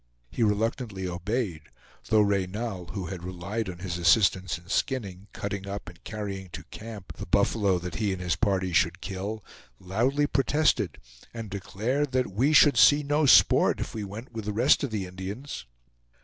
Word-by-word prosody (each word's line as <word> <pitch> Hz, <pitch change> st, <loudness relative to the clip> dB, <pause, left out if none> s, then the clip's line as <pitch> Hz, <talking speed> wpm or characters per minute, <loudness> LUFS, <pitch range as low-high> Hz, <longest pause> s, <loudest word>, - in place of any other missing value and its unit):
He -, -, -4 dB
reluctantly 105 Hz, -2 st, 0 dB
obeyed, 90 Hz, -1 st, -2 dB, 0.5 s
though 110 Hz, -1 st, +5 dB
Reynal, 100 Hz, -1 st, -1 dB
who 95 Hz, 0 st, -5 dB
had 90 Hz, 0 st, -6 dB
relied 95 Hz, +5 st, -4 dB
on 90 Hz, -, -7 dB
his 90 Hz, -1 st, -4 dB
assistance 95 Hz, 0 st, +3 dB
in 85 Hz, 0 st, -17 dB
skinning, 100 Hz, -6 st, -2 dB
cutting 100 Hz, -1 st, -5 dB
up, 100 Hz, +1 st, -5 dB
and 90 Hz, +2 st, -17 dB
carrying 100 Hz, -4 st, -5 dB
to -, -, -6 dB
camp 105 Hz, -4 st, -9 dB
the -, -, -7 dB
buffalo 100 Hz, -4 st, +2 dB
that 90 Hz, 0 st, -6 dB
he 105 Hz, -3 st, 0 dB
and 95 Hz, -, -3 dB
his 90 Hz, -3 st, 0 dB
party 95 Hz, -2 st, 0 dB
should 90 Hz, +1 st, +2 dB
kill, 100 Hz, +2 st, -5 dB, 0.4 s
loudly 120 Hz, +10 st, +1 dB
protested 140 Hz, -, +1 dB, 0.4 s
and 115 Hz, -3 st, -6 dB
declared 120 Hz, +9 st, -2 dB
that 130 Hz, -4 st, +1 dB
we 125 Hz, +10 st, +2 dB
should 145 Hz, -4 st, +6 dB
see 145 Hz, +6 st, +6 dB
no 145 Hz, +1 st, +2 dB
sport -, -, +6 dB
if -, -, -4 dB
we 110 Hz, -, -4 dB
went 105 Hz, +5 st, -8 dB
with 110 Hz, -3 st, -6 dB
the 105 Hz, -, -2 dB
rest 125 Hz, +8 st, +4 dB
of 140 Hz, -, -1 dB
the 105 Hz, -4 st, -3 dB
Indians. 95 Hz, -, -7 dB
100 Hz, 175 wpm, -27 LUFS, 95-115 Hz, 0.5 s, should